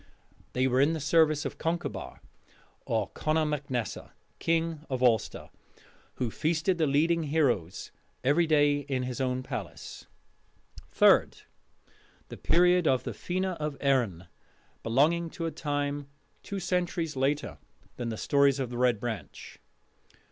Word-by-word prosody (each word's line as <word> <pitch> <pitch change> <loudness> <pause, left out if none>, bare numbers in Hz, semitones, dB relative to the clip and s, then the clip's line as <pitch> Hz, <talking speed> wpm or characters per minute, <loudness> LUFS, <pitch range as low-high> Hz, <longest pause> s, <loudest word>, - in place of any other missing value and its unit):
They 130 +1 +1
were 130 0 +3
in 150 +4 +3
the 160 - -3
service 155 -1 +3
of - - -5
Concobar 170 +2 -3 0.7
or 110 -4 0
Conor 155 0 0
mac 150 -2 -3
Nessa, 120 -4 -4 0.3
king 165 -2 0
of 130 -1 -2
Ulster, 115 -4 +1 0.6
who 120 -3 -2
feasted 165 - 0
the 155 - +3
leading 165 +4 +2
heroes 130 - 0 0.3
every 155 +6 +3
day 145 -2 +3
in 135 -2 -3
his 125 0 -4
own 130 0 -1
palace. - - -7 0.8
Third: - - +4 0.9
The - - -8
Period 180 0 +3
of 130 -1 +2
the - - -4
Fena 185 +1 -2
of 150 -2 -4
Erin, 120 -11 +1 0.6
belonging 160 +8 +2
to 165 - -2
a 165 - -2
time 145 -2 -3 0.3
two 200 - -5
centuries 175 -3 -1
later 140 +3 -1 0.4
than 120 -1 -3
the 110 - -4
stories 140 +1 +3
of 130 -3 -3
the 120 - -4
Red 125 -4 +3
Branch. 110 -10 -6
145 Hz, 140 wpm, -28 LUFS, 125-165 Hz, 0.9 s, Third